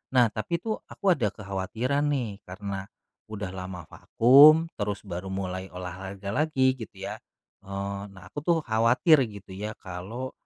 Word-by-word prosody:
Nah 120 Hz, -3 st, +6 dB
tapi 170 Hz, +11 st, -2 dB
tuh 220 Hz, +1 st, -2 dB
aku 200 Hz, -, -1 dB
ada 120 Hz, -10 st, 0 dB
kekhawatiran 110 Hz, +8 st, -2 dB
nih 120 Hz, -8 st, -1 dB
karena 95 Hz, +1 st, -5 dB, 0.5 s
udah 105 Hz, -2 st, -4 dB
lama 90 Hz, -2 st, -6 dB
vakum 150 Hz, +7 st, +7 dB
terus 100 Hz, -2 st, -2 dB
baru 90 Hz, +2 st, -5 dB
mulai 95 Hz, 0 st, -4 dB
olahraga 95 Hz, +2 st, -7 dB
lagi 130 Hz, -1 st, +2 dB
gitu 115 Hz, -4 st, -10 dB
ya. -, -, -5 dB, 0.5 s
Eee, 100 Hz, 0 st, -4 dB
nah 95 Hz, -1 st, -13 dB
aku -, -, -5 dB
tuh 170 Hz, -2 st, +4 dB
khawatir 125 Hz, +6 st, +4 dB
gitu 100 Hz, -2 st, -11 dB
ya 105 Hz, +2 st, -4 dB
kalau, 100 Hz, +8 st, -6 dB
105 Hz, 150 wpm, -27 LUFS, 95-130 Hz, 0.5 s, vakum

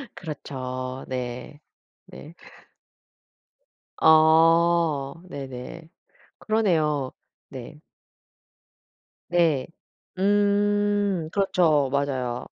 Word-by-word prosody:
그렇죠. 130 Hz, -5 st, -6 dB
네. 125 Hz, +2 st, -6 dB, 0.5 s
네. 160 Hz, +3 st, -12 dB, 1.7 s
어. 160 Hz, -2 st, +4 dB, 0.2 s
네네. 135 Hz, +3 st, -8 dB, 0.5 s
그러네요. 155 Hz, -11 st, 0 dB, 0.4 s
네. 135 Hz, +3 st, -10 dB, 1.5 s
네. 165 Hz, -6 st, +2 dB, 0.5 s
음 205 Hz, -2 st, +1 dB
그렇죠. 165 Hz, -8 st, +2 dB
맞아요. 130 Hz, -3 st, -2 dB
155 Hz, 100 characters per minute, -24 LUFS, 135-175 Hz, 1.7 s, 어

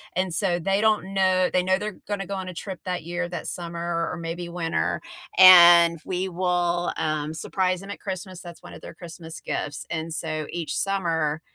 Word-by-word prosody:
And 185 Hz, -1 st, -1 dB
so, 175 Hz, 0 st, +1 dB
they 195 Hz, +4 st, 0 dB
don't 210 Hz, -3 st, +1 dB
know 185 Hz, -1 st, +2 dB
they 185 Hz, -, +3 dB
know 185 Hz, +1 st, +2 dB
they're 210 Hz, 0 st, -6 dB
gonna 205 Hz, -2 st, -3 dB
go 200 Hz, +2 st, -5 dB
on 185 Hz, -1 st, -5 dB
a -, -, -7 dB
trip 190 Hz, +1 st, -7 dB
that 180 Hz, -3 st, -3 dB
year, 175 Hz, +1 st, -3 dB
that 175 Hz, -, -5 dB
summer 170 Hz, -1 st, -5 dB, 0.3 s
or -, -, -5 dB
or 180 Hz, -, -5 dB
maybe 170 Hz, +1 st, -5 dB
winter, 165 Hz, -, -1 dB, 0.4 s
and 170 Hz, -2 st, +9 dB
we 185 Hz, +1 st, -3 dB
will, 175 Hz, -1 st, 0 dB
um, 155 Hz, 0 st, -2 dB
surprise 185 Hz, +3 st, -1 dB
them 195 Hz, -, -8 dB
at -, -, -8 dB
Christmas. 185 Hz, -1 st, -6 dB
That's 175 Hz, -1 st, -11 dB
one -, -, -11 dB
of -, -, -11 dB
their -, -, -10 dB
Christmas 165 Hz, -2 st, -9 dB
gifts. 145 Hz, -1 st, -4 dB
And 160 Hz, 0 st, -3 dB
so, 155 Hz, -2 st, -3 dB
each 170 Hz, -2 st, -4 dB
summer 165 Hz, -6 st, -1 dB
175 Hz, 205 wpm, -24 LUFS, 165-185 Hz, 0.4 s, and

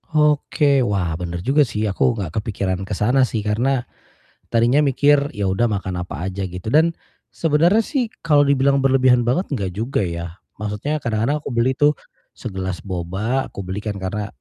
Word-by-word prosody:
Oke, 150 Hz, -2 st, +3 dB
wah 90 Hz, -6 st, -1 dB
bener 85 Hz, -1 st, -4 dB
juga 140 Hz, +6 st, +4 dB
sih 110 Hz, -1 st, -3 dB
aku 115 Hz, +5 st, +1 dB
gak 95 Hz, -7 st, -4 dB
kepikiran 100 Hz, -4 st, -2 dB
ke 105 Hz, -, -4 dB
sana 125 Hz, +7 st, +3 dB
sih, 110 Hz, -, -2 dB
karena 120 Hz, +5 st, 0 dB, 0.7 s
tadinya 120 Hz, +5 st, +3 dB
mikir 145 Hz, +1 st, +3 dB
ya 100 Hz, -1 st, -1 dB
udah 95 Hz, +5 st, +1 dB
makan 95 Hz, -3 st, -3 dB
apa 90 Hz, 0 st, -5 dB
aja 95 Hz, +1 st, -4 dB
gitu 90 Hz, +4 st, -6 dB
dan 160 Hz, +2 st, +5 dB, 0.4 s
sebenernya 165 Hz, +7 st, +3 dB
sih 250 Hz, -4 st, -1 dB
kalau 150 Hz, -3 st, +5 dB
dibilang 140 Hz, 0 st, +3 dB
berlebihan 130 Hz, -2 st, +4 dB
banget, 125 Hz, +11 st, 0 dB
gak 100 Hz, -7 st, -2 dB
juga 115 Hz, -1 st, -1 dB
ya, 85 Hz, -1 st, -3 dB, 0.3 s
maksudnya 105 Hz, +9 st, -2 dB
kadang-kadang 115 Hz, +2 st, 0 dB
aku 145 Hz, -, -7 dB
beli 115 Hz, +2 st, +2 dB
tuh 150 Hz, 0 st, +4 dB, 0.4 s
segelas 95 Hz, -5 st, -5 dB
boba, 95 Hz, +8 st, -2 dB
aku 100 Hz, -, -8 dB
beli 95 Hz, +1 st, -5 dB
kan 105 Hz, 0 st, -4 dB
karena, 100 Hz, +2 st, -3 dB
115 Hz, 170 wpm, -21 LUFS, 95-140 Hz, 0.7 s, dan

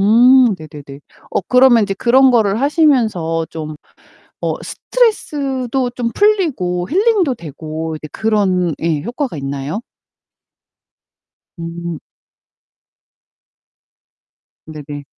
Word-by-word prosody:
음 240 Hz, +3 st, +5 dB
네네네. 145 Hz, -2 st, -11 dB, 0.3 s
어 -, -, 0 dB
그러면 250 Hz, -2 st, +5 dB
인제 195 Hz, -1 st, -3 dB
그런 260 Hz, +5 st, +4 dB
거를 220 Hz, -3 st, +2 dB
하시면서 230 Hz, -, +1 dB
좀 155 Hz, -1 st, -6 dB, 0.7 s
어 -, -, 0 dB
스트레스도 270 Hz, -, -1 dB
좀 240 Hz, -1 st, -2 dB
풀리고 265 Hz, -, +1 dB
힐링도 390 Hz, -, +2 dB
되고 160 Hz, -, -6 dB
이제 155 Hz, 0 st, -8 dB
그런 190 Hz, -6 st, 0 dB
예 160 Hz, -3 st, 0 dB
효과가 245 Hz, -, -4 dB
있나요? 140 Hz, +7 st, -4 dB, 1.8 s
음. 170 Hz, -1 st, -6 dB, 2.7 s
네네. 145 Hz, -2 st, -8 dB
210 Hz, 190 characters per minute, -17 LUFS, 160-260 Hz, 2.7 s, 음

